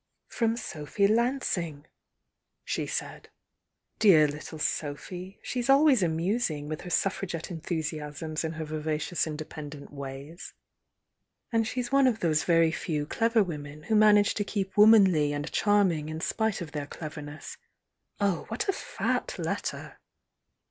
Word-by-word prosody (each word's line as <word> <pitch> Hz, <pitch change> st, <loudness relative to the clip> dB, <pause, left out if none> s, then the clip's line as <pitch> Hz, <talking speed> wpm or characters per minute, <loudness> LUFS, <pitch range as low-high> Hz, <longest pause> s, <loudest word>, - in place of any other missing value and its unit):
"From 230 Hz, -1 st, 0 dB
Sophy 155 Hz, 0 st, -2 dB
Lansing," 210 Hz, -, 0 dB, 0.8 s
she -, -, -2 dB
said. -, -, -5 dB, 0.7 s
"Dear 165 Hz, -8 st, +7 dB
little 150 Hz, +2 st, -7 dB
Sophy! 175 Hz, +6 st, -4 dB
She's 245 Hz, 0 st, -3 dB
always 275 Hz, -3 st, +6 dB
amusing, 165 Hz, -2 st, 0 dB
with 155 Hz, 0 st, -4 dB
her 180 Hz, -, -8 dB
Suffragette 180 Hz, -2 st, -1 dB
enthusiasms, 155 Hz, -2 st, -4 dB
and 160 Hz, 0 st, -3 dB
her 160 Hz, 0 st, -4 dB
vivacious 155 Hz, +2 st, -2 dB
independent 150 Hz, -2 st, -7 dB
ways! 140 Hz, +4 st, -8 dB, 1.0 s
And 225 Hz, -2 st, +2 dB
she's 250 Hz, +1 st, -3 dB
one 275 Hz, -1 st, +5 dB
of 230 Hz, -4 st, +1 dB
those 155 Hz, -4 st, +1 dB
very 165 Hz, -2 st, +4 dB
few 150 Hz, -3 st, -2 dB
clever 230 Hz, +6 st, +2 dB
women 150 Hz, -4 st, -7 dB
who 220 Hz, -, 0 dB
manage 210 Hz, 0 st, +6 dB
to 205 Hz, -, -1 dB
keep 195 Hz, -2 st, -3 dB
womanly 195 Hz, -9 st, +6 dB
and 145 Hz, +2 st, -4 dB
charming 190 Hz, -7 st, +2 dB
in 155 Hz, 0 st, -4 dB
spite 220 Hz, +4 st, -1 dB
of 160 Hz, -4 st, -6 dB
their 145 Hz, -2 st, -4 dB
cleverness. 150 Hz, -1 st, -8 dB, 0.6 s
Oh, 200 Hz, -4 st, 0 dB
what 225 Hz, +2 st, -3 dB
a 390 Hz, -, +2 dB
fat -, -, -2 dB
letter!" -, -, -4 dB
165 Hz, 135 wpm, -28 LUFS, 150-210 Hz, 1.0 s, Dear